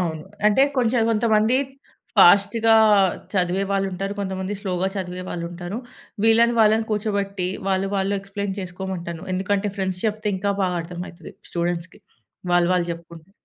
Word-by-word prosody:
అవును. 160 -3 -2 0.2
అంటే 215 +6 +5 0.2
కొంచెం 240 -1 +2
కొంతమంది 220 +1 +2 0.6
ఫాస్ట్‌గా 205 +4 +6 0.6
చదివే 185 0 +1
వాళ్ళుంటారు. 195 0 -1
కొంతమంది 190 0 -3
స్లో‌గా 190 -2 -1
చదివే 185 -1 -4
వాళ్ళుంటారు. 175 +4 -5 0.5
వీళ్ళని 230 +1 +5
వాళ్ళని 220 +1 +4
కూర్చోబెట్టి 200 -3 -1 0.2
వాళ్ళు 190 0 +1
వాళ్ళు 195 +1 0
ఎక్స్‌ప్లెయిన్ 200 0 -5
చేసుకోమంటాను. 180 -2 -6
ఎందుకంటే 200 +2 0
ఫ్రెండ్స్ 190 -1 -2
చెప్తే 215 0 -2
ఇంకా 200 +2 0
బాగా 180 -2 0
అర్థం 175 +1 -7
అయితది 175 0 -13 0.2
స్టూడెంట్స్‌కి. 170 0 -3 0.5
వాళ్ళు 175 -1 +4
వాళ్ళు 175 -1 +1
జెప్పుకుంటే. 170 +1 -12
190 Hz, 130 wpm, -23 LUFS, 180-205 Hz, 0.6 s, ఫాస్ట్‌గా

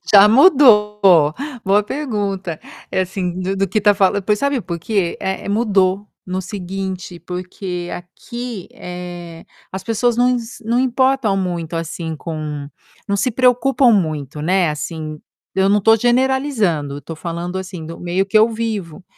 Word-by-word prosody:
Já 205 +1 +9
mudou, 230 - +6 0.6
boa 200 +2 +3
pergunta. 200 - -3 0.3
É 190 - +1
assim 185 -1 -3
do 190 +1 -2
do 195 0 0
que 200 - 0
está 205 0 +5
fala 200 0 +2
pois, 210 +2 +1
sabe 280 0 0
por 170 -5 -5
quê? 195 -2 -1
É 190 0 -3
é - - -5
mudou, 200 -2 +1 0.2
no 185 0 -3
seguinte 190 -1 -5
porque 180 0 -6
aqui, 230 +4 -7
eh, 175 -2 -8 0.3
as 190 0 -5
pessoas 230 +1 0
não 245 +1 +4
ins 240 -2 -4
não 235 +2 +1
importam 260 -4 +2
muito, 175 -3 -3
assim, 165 0 -4
com 150 -2 -5 0.4
não 200 - +1
se 215 +5 0
preocupam 250 +1 +3
muito, 155 - 0
né, 175 +1 +2
assim, 155 0 -5 0.4
eu 190 0 +3
não 205 - +4
estou 225 +2 +5
generalizando, 240 - +1
eu - - -6
estou 150 +3 -8
falando 170 +2 -4
assim 185 -3 -7
do 165 +1 -8
meio 175 +2 0
que 205 +2 +3
eu 220 - +5
vivo. 215 -7 -4
195 Hz, 160 wpm, -19 LUFS, 175-225 Hz, 0.6 s, Já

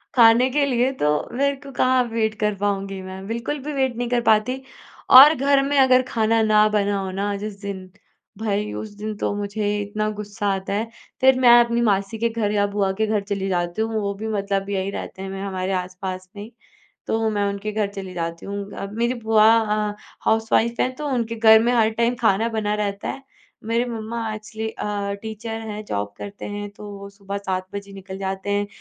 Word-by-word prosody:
खाने 235 +1 +6
के 285 +2 +2
लिए 255 -1 +1
तो 150 0 +1
मेरे 280 0 +2
को 275 0 -12
कहाँ 255 0 +3
वेट 220 -1 0
कर 210 -1 +1
पाऊँगी 195 -1 -2
मैं, 190 +1 -8
बिल्कुल 235 +6 -3
भी 300 +1 -4
वेट 265 -3 0
नहीं 245 0 -2
कर 245 -1 +1
पाती। 235 +4 +2 0.5
और 280 +4 +11
घर 275 +1 +3
में 285 +1 0
अगर 255 -1 +6
खाना 225 -1 +2
ना 215 -1 +5
बना 205 -1 +1
हो 190 -1 -3
ना 200 +2 -2
जिस 205 -1 -6
दिन, 190 -2 -6 0.5
भई 210 -1 -1
उस 220 - -5
दिन 215 +1 -4
तो - - -1
मुझे 205 0 -2
इतना 215 +1 -2
गुस्सा 205 -1 -5
आता 190 0 -3
है, 220 +3 -1 0.3
फिर 260 0 +5
मैं 250 -2 +6
अपनी 235 0 -1
मासी 200 -1 +1
के 235 +1 +1
घर 225 -2 -1
या 205 -1 +2
बुआ 200 -1 0
के 220 +3 0
घर 215 -1 +1
चली 195 -1 -3
जाती 175 +2 -1
हूँ, 225 0 -1
वो 200 0 -1
भी 215 +3 -6
मतलब 200 -2 -1
यही 195 -1 -1
रहते 190 - -7
हैं, 195 - -5
मैं 195 0 -6
हमारे 190 -1 -3
आस-पास 185 0 -4
में 205 - -7
ही, 220 - -11 0.6
तो 225 0 0
मैं 205 -1 0
उनके 200 +1 -4
घर 210 -1 0
चली 195 -2 -7
जाती 170 -1 -4
हूँ। 200 0 -5
अ, - - -5
मेरी 235 +3 0
बुआ 220 -2 +3
अ, 210 -1 0 0.3
हाउसवाइफ़ 225 +1 +2
हैं 255 - -1
तो 300 +1 -4
उनके 235 -4 -1
घर 220 -1 +7
में 240 - +2
हर 225 -2 +3
टाइम 235 +2 +1
खाना 220 0 +3
बना 215 -2 -1
रहता 205 -1 -3
है, 270 - -5 0.4
मेरे 230 +2 +1
मम्मा 225 -1 -4
एक्चुअली 220 +1 -5
अ, 205 -2 -3
टीचर 220 0 -5
हैं, 210 0 -6
जॉब 100 - -3
करते 205 0 -8
हैं 205 0 -5
तो 205 0 -10
वो 200 0 -9
सुबह 200 0 -6
7 185 -2 -3
बजे 200 0 -6
निकल 190 -1 -8
जाते 190 +1 -3
हैं, 205 0 +1
210 Hz, 210 wpm, -22 LUFS, 200-230 Hz, 0.6 s, और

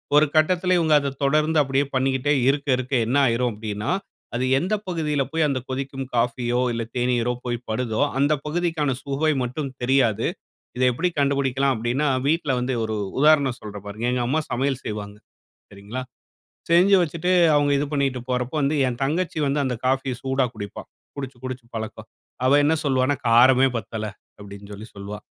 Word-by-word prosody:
ஒரு 150 - +7
கட்டத்தில 180 +3 +3
இவங்க 160 -2 +2
அத 140 -1 -2
தொடர்ந்து 155 +3 +2
அப்படியே 135 0 +1
பண்ணிகிட்டே 130 +2 +1 0.2
இருக்க 145 +1 0
இருக்க 130 +2 -5
என்ன 125 +5 -1
ஆயிரும் 120 +1 +1
அப்படின்னா, 105 0 -4 0.5
அது 125 +1 0
எந்த 185 +7 -2
பகுதியில 155 -5 -1
போய் 160 -1 +2
அந்த 135 -3 -1
கொதிக்கும் 135 0 -4
காஃபியோ 120 +1 0
இல்ல 115 - -2
தேனீரோ 125 -1 +1
போய் 120 -1 -1
படுதோ, 110 +1 -1 0.2
அந்த 145 +2 +3
பகுதிக்கான 160 -3 0
சுவை 140 +3 0
மட்டும் 135 +2 -4
தெரியாது. 120 -4 +2 0.5
இத 130 - -1
எப்படி 180 +9 0
கண்டுபிடிக்கலாம்? 140 -1 +1
அப்படின்னா, 120 +6 -1 0.2
வீட்ல 150 -3 +1
வந்து 125 +1 -1
ஒரு 110 - -3 0.2
உதாரணம் 145 -4 +4
சொல்றேன். 105 -1 -9
பாருங்க. 110 +4 -4
எங்க 125 - 0
அம்மா 155 +5 +1
சமையல் 130 +1 -1
செய்வாங்க. 105 -1 -5 0.6
சரிங்களா? 100 +6 -7 0.7
செஞ்சு 180 +4 +6
வச்சுட்டு 170 +2 -1 0.2
அவங்க 145 -1 +3
இது 145 - 0
பண்ணிட்டு 135 -3 0
போறப்ப 125 +1 -1
வந்து 140 +2 +1
என் 120 0 -4
தங்கச்சி 160 +4 -1
வந்து 140 +1 0
அந்த 130 -2 -1
காஃபிய 130 0 +1
சூடா 135 -1 +1
குடிப்பா. 100 -2 -7 0.3
குடிச்சு, 135 -3 -6
குடிச்சு 130 -2 -6
பழக்கம். 110 0 -6 0.4
அவ 140 +2 +5
என்ன 160 +2 +3
சொல்லுவான்னா 130 +1 +2
"காரமே 130 +3 +6
பத்தல" 110 +1 -5 0.3
அப்படின்னு 100 0 -11
சொல்லி 105 +3 -9
சொல்வா. 100 +1 -7
130 Hz, 160 wpm, -23 LUFS, 120-145 Hz, 0.7 s, ஒரு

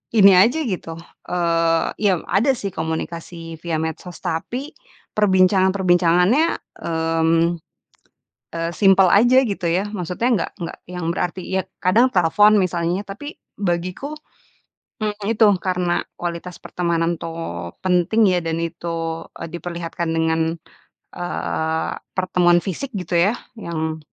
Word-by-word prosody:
ini 200 -2 +8
aja, 245 +11 +4
gitu, 185 - -4 0.3
eee 165 -2 +1
iya, 195 -5 +2
ada 230 +8 +4
sih 200 -4 -4
komunikasi 165 0 -5
via 170 0 -3
medsos. 160 +2 -5
Tapi, 250 - -3 0.4
perbincangan-perbincangannya, 190 - +3 0.3
mmm, 165 0 +1 1.1
eee, 165 0 -2
simpel 195 0 +5
aja 245 +6 +6
gitu 200 -6 -2
ya, 175 +3 +1
maksudnya 185 +5 -2
nggak 225 - 0
nggak 170 - -6
yang 180 -2 -5
berarti, 180 +1 -2 0.2
ya - - +2 0.2
kadang 220 +8 +5
telepon, 205 +5 +5
misalnya. 175 +1 -1
Tapi 210 +10 -8 0.2
bagiku, 185 - -2 0.8
mmm, 210 -1 -2
itu, 225 -1 +4 0.2
karena 180 -2 0 0.2
kualitas 175 +1 -5
pertemanan 170 -1 -1
tuh 125 - -5 0.2
penting 185 +5 +3
ya, 180 -2 +2
dan 165 0 -2
itu, 165 -1 -3 0.2
eee, - - -6
diperlihatkan 170 -1 -4
dengan, 160 0 +1 0.8
eee, 160 -2 -2 0.3
pertemuan 180 -2 +3
fisik 255 +9 -4
gitu 180 -2 -1
ya, 200 +6 +3 0.3
yang 160 -2 -3
175 Hz, 120 wpm, -21 LUFS, 165-195 Hz, 1.1 s, ini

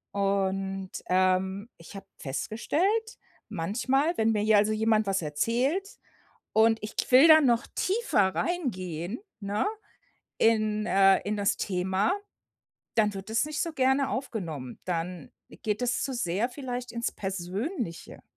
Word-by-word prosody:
Und, 195 -1 -1 0.2
ähm, 185 +3 +1
ich 165 +4 -13
habe 195 - -10
festgestellt: 340 - -1 0.3
Manchmal, 260 - 0
wenn 225 0 +3
mir 210 -1 +1
hier 215 0 +4
also 210 +1 +3
jemand 215 -1 +2
was 195 -2 +1
erzählt, 240 - 0 0.7
und 225 +1 +4
ich 210 - -7
k - - +1
will 265 +6 +8
dann 315 -2 +8
noch 235 -1 +2
tiefer 380 - +1
reingehen, 185 - -3 0.2
ne, 205 +1 -1 0.7
in, 215 -1 +2
äh 195 -2 +5
in 210 - 0
das 200 -1 +1
Thema, 190 - 0 0.8
dann 210 -2 +2
wird 195 +2 -7
das 230 +6 +1
nicht 305 -1 -2
so 335 - -3
gerne 265 0 +2
aufgenommen. 170 - -5
Dann 175 -2 -4 0.3
geht 210 +1 -1
es 245 -1 0
zu 270 - -2
sehr, 225 +1 -1
vielleicht, 250 -2 -5
ins 235 0 -2
Persönliche. 195 - -5
215 Hz, 135 wpm, -28 LUFS, 190-250 Hz, 0.8 s, will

